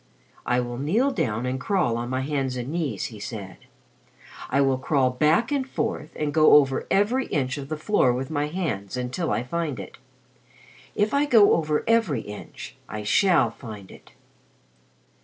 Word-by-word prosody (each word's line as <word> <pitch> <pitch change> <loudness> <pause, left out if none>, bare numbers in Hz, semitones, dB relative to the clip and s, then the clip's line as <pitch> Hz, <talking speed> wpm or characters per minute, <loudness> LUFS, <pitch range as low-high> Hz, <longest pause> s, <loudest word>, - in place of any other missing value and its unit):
"I 125 - +2
will 120 0 -5
kneel 215 - +1
down 125 - -1
and 130 +1 -2
crawl 175 - +1
on 120 +1 -3
my 130 0 -1
hands 135 -2 -2
and 125 +1 -4
knees," 150 - -2
he 105 - -10
said. 100 -2 -7 0.9
"I 135 - +1
will 135 -2 +2
crawl 130 -1 +1
back 155 - +2
and 270 -2 -1
forth 225 -12 -3
and 150 -1 -2
go 155 -1 +6
over 135 -3 +3
every 230 +7 +2
inch 135 -1 -1
of 140 0 -8
the 155 - -3
floor 155 -5 +2
with 130 +4 -3
my 145 -1 0
hands 135 - -3
until 125 +7 -3
I 110 +3 0
find 150 -2 -3
it. 95 - -10 1.0
If 210 +4 +1
I 285 +1 +3
go 225 -7 +6
over 150 -2 0
every 225 - +2
inch, 105 -1 -10
I 105 0 -5
shall 165 - +3
find 110 -6 -10
it." - - -16
140 Hz, 175 wpm, -25 LUFS, 125-170 Hz, 1.0 s, go